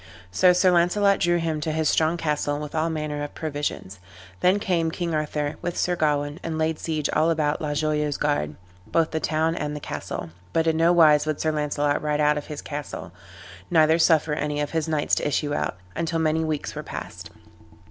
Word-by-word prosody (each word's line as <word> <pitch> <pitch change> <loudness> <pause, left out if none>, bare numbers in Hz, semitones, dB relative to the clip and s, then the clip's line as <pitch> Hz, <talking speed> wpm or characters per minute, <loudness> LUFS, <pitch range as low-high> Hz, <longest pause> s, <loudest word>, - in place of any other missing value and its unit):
So 180 - +5
Sir 180 +1 +4
Launcelot 195 +3 +3
drew 175 0 +2
him 160 -2 -2
to 155 0 -1
his 160 0 0
strong 160 +2 +2
castle, 150 -2 -1
with 150 0 -6
all 160 +1 0
manner 150 -2 -3
of 145 - -6
provisions. 145 - -4 0.4
Then 185 +2 +4
came 175 -5 0
King 170 0 -3
Arthur 150 -1 -2
with 175 - -3
Sir 180 - +1
Gawain, 145 -1 0
and 165 -1 -4
laid 160 0 0
siege 155 -3 -1
all 160 - +3
about 155 -2 0
La 150 -1 -2
Joyeuse 150 -1 0
Garde, 145 - -1 0.3
both 165 -1 +1
the 160 - -1
town 160 +1 0
and 150 -2 -3
the - - -4
castle; 85 - -6 0.2
but 165 - +2
in 160 -1 +2
no 165 +2 +4
wise 155 -3 +5
would 155 -2 -1
Sir 155 - +1
Launcelot 145 -1 0
ride 150 -1 -1
out 150 0 +3
of 150 - -5
his 150 -2 -7
castle, 145 - -6 0.6
neither 160 -1 +4
suffer 160 -2 +3
any 150 0 -2
of 145 0 -2
his 160 -1 -1
knights 155 -2 -1
to - - +2
issue 145 0 0
out, 90 - -2 0.2
until 165 0 -1
many 160 0 +1
weeks 155 -2 -3
were - - -5
past. - - -8
155 Hz, 205 wpm, -24 LUFS, 150-165 Hz, 0.6 s, So